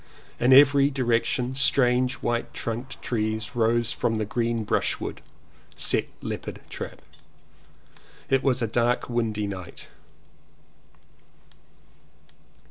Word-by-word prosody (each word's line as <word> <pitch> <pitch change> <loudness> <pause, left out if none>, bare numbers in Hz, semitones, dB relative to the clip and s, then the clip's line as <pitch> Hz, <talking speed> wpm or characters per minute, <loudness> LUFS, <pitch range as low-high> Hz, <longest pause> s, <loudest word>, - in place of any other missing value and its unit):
In 125 +2 +3
every 140 +1 +7
direction 125 -1 0
strange 125 -1 +2
white 120 0 -2
trunked 120 +3 -5
trees 110 +2 -2
rose 115 0 +2
from 115 -1 -1
the 110 - -1
green 115 +1 -1
brushwood. 105 - -1 0.5
Set - - 0 0.2
leopard - - -5
trap. - - -7 1.2
It 135 -1 +2
was 130 -3 +1
a - - +1
dark 120 +2 0
windy 110 -3 -1
night. 95 -3 -7
120 Hz, 100 wpm, -25 LUFS, 115-130 Hz, 1.2 s, every